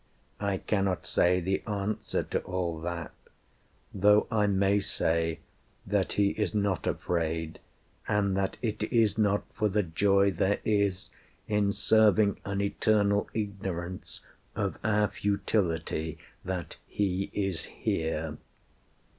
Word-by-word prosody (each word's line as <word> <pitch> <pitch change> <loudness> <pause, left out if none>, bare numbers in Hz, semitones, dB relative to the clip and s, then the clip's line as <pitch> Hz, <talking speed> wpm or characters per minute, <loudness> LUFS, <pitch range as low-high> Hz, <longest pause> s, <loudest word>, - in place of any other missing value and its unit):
I 100 -2 0
cannot 95 -2 -1
say 90 +1 +3
the 95 +2 -1
answer 105 +1 -2
to - - -2
all 90 -3 -3
that; 85 -1 -4 0.8
Though 105 +2 +5
I 105 -2 +3
may 100 +1 +3
say 80 -4 -1 0.4
that 100 -1 0
He 100 -1 +3
is 105 +1 -2
not 100 -5 0
afraid, 80 -2 -1 0.5
And 100 -2 +1
that 95 0 -1
it 110 -3 -2
is 110 -4 +3
not 105 -1 +2
for 110 -3 +1
the 105 +1 +1
joy 100 +3 +3
there 95 +1 +1
is 100 -3 +1 0.4
In 105 -1 +2
serving 105 -1 +4
an 100 0 -1
eternal 100 0 +2
Ignorance 95 -4 -4 0.3
Of - - -2
our 105 -1 +3
futility 85 -7 -1 0.3
that 90 -3 -4
He 95 -1 -1
is 95 -5 -1
here. 80 -1 -2
100 Hz, 120 wpm, -29 LUFS, 90-105 Hz, 0.8 s, Though